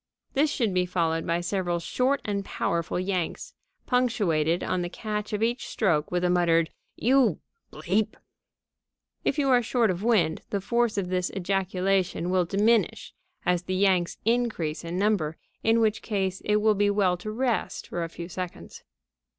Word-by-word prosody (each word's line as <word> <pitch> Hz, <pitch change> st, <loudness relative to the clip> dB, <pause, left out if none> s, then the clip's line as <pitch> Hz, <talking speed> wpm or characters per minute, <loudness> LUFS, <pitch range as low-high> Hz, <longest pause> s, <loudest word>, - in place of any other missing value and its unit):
This 295 Hz, +2 st, +3 dB
should 230 Hz, -9 st, 0 dB
be 180 Hz, 0 st, +1 dB
followed 165 Hz, -2 st, 0 dB
by 170 Hz, 0 st, +1 dB
several 175 Hz, -1 st, -1 dB
short 255 Hz, +10 st, 0 dB
and 200 Hz, -1 st, -1 dB
powerful 170 Hz, -2 st, -2 dB
yanks, 185 Hz, -2 st, -2 dB, 0.3 s
punctuated 185 Hz, -, +1 dB
on 185 Hz, -, -1 dB
the 175 Hz, -, -3 dB
catch 210 Hz, +2 st, -4 dB
of 210 Hz, +1 st, -1 dB
each 240 Hz, +2 st, -1 dB
stroke 160 Hz, -9 st, +1 dB
with 180 Hz, 0 st, -1 dB
a 180 Hz, -, +3 dB
muttered: 170 Hz, -2 st, +3 dB, 0.2 s
"You 245 Hz, -, +3 dB, 0.3 s
!" -, -, -45 dB, 1.5 s
If -, -, 0 dB
you 280 Hz, -2 st, +2 dB
are 250 Hz, -2 st, +5 dB
short 230 Hz, -2 st, +2 dB
of 180 Hz, 0 st, -4 dB
wind, 200 Hz, -9 st, +2 dB
the 200 Hz, -, -1 dB
force 235 Hz, +2 st, 0 dB
of 185 Hz, -3 st, -1 dB
this 180 Hz, 0 st, 0 dB
ejaculation 190 Hz, -1 st, 0 dB
may 185 Hz, -1 st, +3 dB
diminish 205 Hz, +3 st, +1 dB, 0.3 s
as 180 Hz, -1 st, +2 dB
the 185 Hz, +1 st, -3 dB
yanks 185 Hz, -2 st, +2 dB
increase 225 Hz, -10 st, 0 dB
in 170 Hz, +1 st, -4 dB
number, 185 Hz, -6 st, +1 dB, 0.2 s
in 225 Hz, +1 st, +3 dB
which 220 Hz, -1 st, +1 dB
case 190 Hz, -3 st, -2 dB
it 210 Hz, -, +2 dB
will 215 Hz, +1 st, +4 dB
be 205 Hz, 0 st, +2 dB
well 200 Hz, -3 st, +2 dB
to 195 Hz, +5 st, -6 dB
rest 235 Hz, +1 st, -1 dB
for 170 Hz, -, -3 dB
a 165 Hz, -, -4 dB
few 170 Hz, +1 st, -7 dB
seconds. 180 Hz, -, -7 dB
190 Hz, 165 wpm, -26 LUFS, 175-220 Hz, 1.5 s, are